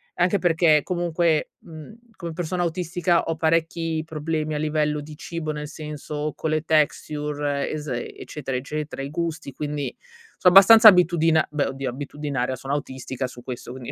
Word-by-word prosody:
Anche 180 +3 +2
perché, 165 -3 +3
comunque, 170 -2 0
mhmm, 160 +5 -11 0.2
come 170 -2 -6
persona 175 +1 -3
autistica, 175 0 0
ho 165 - -2
parecchi 165 0 0
problemi 155 0 -3
a - - -1
livello 150 -1 0
di 150 +1 -10
cibo, 165 -2 -4
nel 150 -1 -5
senso 150 -1 -5
con 160 - -3
le 155 -1 +1
texture, 150 -2 0
es 150 -1 -5
eccetera, 130 +2 -5
eccetera, 150 +3 -4
i 135 - -5
gusti, 160 -1 -4
quindi, 145 0 -4 0.4
so' 180 - +5
abbastanza 215 +4 +9
abitudina 165 -4 +4
beh, 150 -1 0
oddio, 135 -1 -4
abitudinaria, 140 -1 -3
sono 135 +2 -5
autistica 130 -2 -4
su 125 -1 -9
questo, 120 -1 -7
quindi 125 -1 -7
155 Hz, 155 wpm, -24 LUFS, 145-165 Hz, 0.4 s, abbastanza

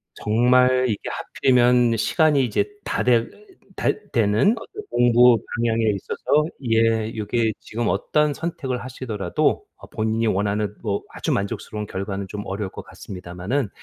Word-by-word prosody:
정말 125 +3 +3
이게 105 - -1
하필이면 125 -2 +2
시간이 150 +3 +3
이제 120 - 0
다 - - -1
되 120 -2 +3 0.5
다 - - -1 0.2
되는 115 - +3
어떤 425 - -9
공부 120 0 +5 0.2
방향에 115 -1 +1
있어서 150 +9 0 0.3
예 115 0 +2
요게 110 +1 0
지금 115 0 -3
어떤 150 -1 +1
선택을 140 -7 -4
하시더라도 110 -8 -1
어 - - -13
본인이 110 +1 -1
원하는 105 +1 0
뭐 100 -3 -1
아주 - - -3
만족스러운 105 +1 -3
결과는 95 0 -4
좀 105 +2 -6
어려울 100 0 -4
것 - - -8
같습니다만은 95 +7 -4
115 Hz, 315 characters per minute, -22 LUFS, 105-125 Hz, 0.5 s, 공부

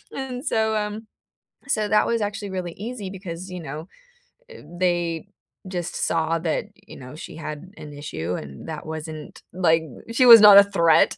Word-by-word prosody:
And 265 -1 -5
so, 220 -4 +1
um 210 +1 -3 0.6
so 215 -5 0
that 210 - +3
was 235 -1 0
actually 205 0 -4
really 180 -2 -4
easy 215 -2 -6
because, 185 -1 -8
you 180 -1 -6
know, 155 +2 -7 0.6
eh, 470 - -12 0.2
they 175 -2 0 0.4
just 175 -2 -4
saw 165 0 0
that, 165 +4 -2 0.2
you - - -11
know, 130 +3 -11
she 165 - -9
had 155 +3 -8
an 150 -1 -10
issue 90 - -5
and 70 - -9
that 155 -1 -6
wasn't 155 -1 -8
like 165 -2 +2 0.3
she 255 +2 +3
was 230 -2 +11
not 205 -1 +10
a 200 - +10
threat, 170 -5 +3
180 Hz, 170 wpm, -23 LUFS, 160-210 Hz, 0.6 s, was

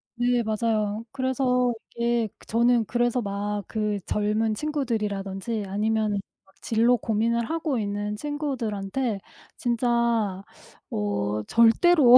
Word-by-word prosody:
네. 245 0 +2
맞아요. 215 -1 0
그래서 255 -2 +1 0.2
이게 235 -1 +1 0.2
저는 235 0 +3
그래서 240 +1 +1
막 200 -1 -3 0.2
그 210 -2 -1
젊은 215 +1 +1
친구들이라든지 215 -7 -2
아니면 215 +2 +1 0.3
막 195 - -27
진로 235 +2 +3
고민을 230 +2 0
하고 320 -4 -1
있는 205 0 -2
친구들한테 240 -6 -2 0.4
진짜 235 -5 +1 0.5
어 105 0 -1
절대로 245 +3 +7
225 Hz, 240 characters per minute, -26 LUFS, 210-245 Hz, 0.5 s, 절대로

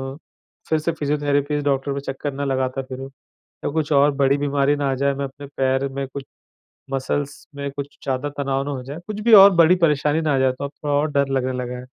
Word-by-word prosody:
अ, - - -13 0.5
फिर 160 -1 +2
से 165 +2 -1
physiotherapies 145 -1 0
doctor 140 0 0
पे 140 - -3
चक्कर 140 +1 -5
ना 140 +1 -3
लगाता 130 0 -1
फिरूँ, 130 +1 -8 0.6
या - - +1
कुछ 155 0 -1
और 145 +1 +5
बड़ी 140 0 +3
बीमारी 145 0 +1
ना 145 -1 -1
आ - - 0
जाए। 140 +1 +1
मैं 140 0 -2
अपने 140 +1 -10
पैर 135 +1 +1
में, 135 0 -4
कुछ 135 +1 -8 0.7
मसल्स 140 +2 -3
में 140 0 -4
कुछ 140 0 -7
ज़्यादा 135 +2 -2
तनाव 135 0 0
ना 145 - -3
हो 130 -3 -5
जाए, 140 +4 -7
कुछ 210 -1 -5
भी 230 +1 +3
और 200 -1 +10
बड़ी 170 +1 +6
परेशानी 150 +1 +1
ना 150 -3 +1
आ - - +1
जाए। 130 0 +3
तो 130 - -8
अब 140 - -6
थोड़ा 145 -1 0
और 145 +1 +1
डर 140 -1 +2
लगने 130 0 -2
लगा 125 0 -5
है। 125 - -10
140 Hz, 235 wpm, -22 LUFS, 135-145 Hz, 0.7 s, और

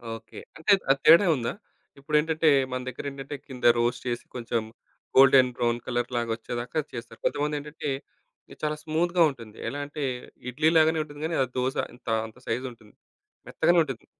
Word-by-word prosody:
Okay. 115 0 -11 0.2
అంటే 160 +6 +1 0.2
అది 135 0 +4
తేడా 170 +4 +8
ఉందా? 120 -3 -2 0.5
ఇప్పుడేంటంటే 155 +2 +2 0.2
మన 130 - -2
దగ్గరేంటంటే 135 +2 -6
కింద 130 -3 -10 0.2
రోస్ట్ 120 +1 0
చేసి 120 -1 -3
కొంచెం 120 -1 -1 0.5
గోల్డెన్ 130 -1 +7
బ్రౌన్ 120 -1 0
కలర్‌లాగొచ్చేదాకా 120 +2 -2
చేస్తారు. 115 -2 -8
కొంతమందేంటంటే 150 0 -2 0.6
ఇది - - -13
చాలా 150 0 0
స్మూత్‌గా 170 +2 +2
ఉంటుంది. 115 -6 -11
ఎలా 140 +4 -5
అంటే 145 0 -6 0.5
ఇడ్లీ 155 +5 +3
లాగానే 160 0 +4
ఉంటుంది 145 0 -10
కానీ 165 0 -1
ఆ - - 0
దోస 130 +1 0 0.2
ఇంత 125 - -24 0.2
అంత 110 - -16
సైజ్ 125 +3 -1
ఉంటుంది. 110 -3 -18 0.5
మెత్తగానే 170 +2 +3
ఉంటుంది. 135 -6 -7
135 Hz, 150 wpm, -26 LUFS, 120-155 Hz, 0.6 s, తేడా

